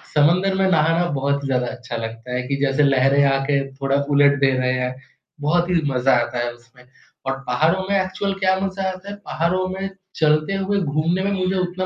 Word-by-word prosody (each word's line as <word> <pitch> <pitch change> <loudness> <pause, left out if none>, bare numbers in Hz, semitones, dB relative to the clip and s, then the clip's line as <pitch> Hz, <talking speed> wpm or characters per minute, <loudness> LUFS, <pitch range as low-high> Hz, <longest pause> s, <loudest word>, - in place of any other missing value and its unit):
समुंदर 175 +6 +3
में 190 0 +2
नहाना 165 +1 +3
बहुत 140 +1 -1
ज़्यादा 125 -2 0
अच्छा 120 -1 -6
लगता 115 +2 -6
है, 125 0 -1
कि 140 - -1
जैसे 135 +2 +2
लहरें 140 0 +4
आके 135 +1 +1
थोड़ा 135 0 0
उलट 145 0 +4
दे 135 -1 +4
रहे 130 0 +1
है, 125 0 -2 0.5
बहुत 175 +4 +1
ही 180 - +1 0.2
मज़ा 130 +1 +2
आता 120 +1 -3
है 120 0 -1
उसमें 125 +1 -21 0.4
और 135 - +1
पहाड़ो 160 +9 +1
में 200 -1 +2
एक्चुअल 190 +1 -2
क्या 190 -1 +3
मज़ा 195 0 -3
आता 185 +1 -8
है, 205 - -6
पहाड़ो 180 +3 0
में 195 +1 -4 0.3
चलते 155 +3 +2
हुए 195 +1 0
घूमने 160 +3 0
में 200 - 0
मुझे 190 -1 0
उतना 185 0 -2
150 Hz, 195 wpm, -21 LUFS, 135-185 Hz, 0.5 s, लहरें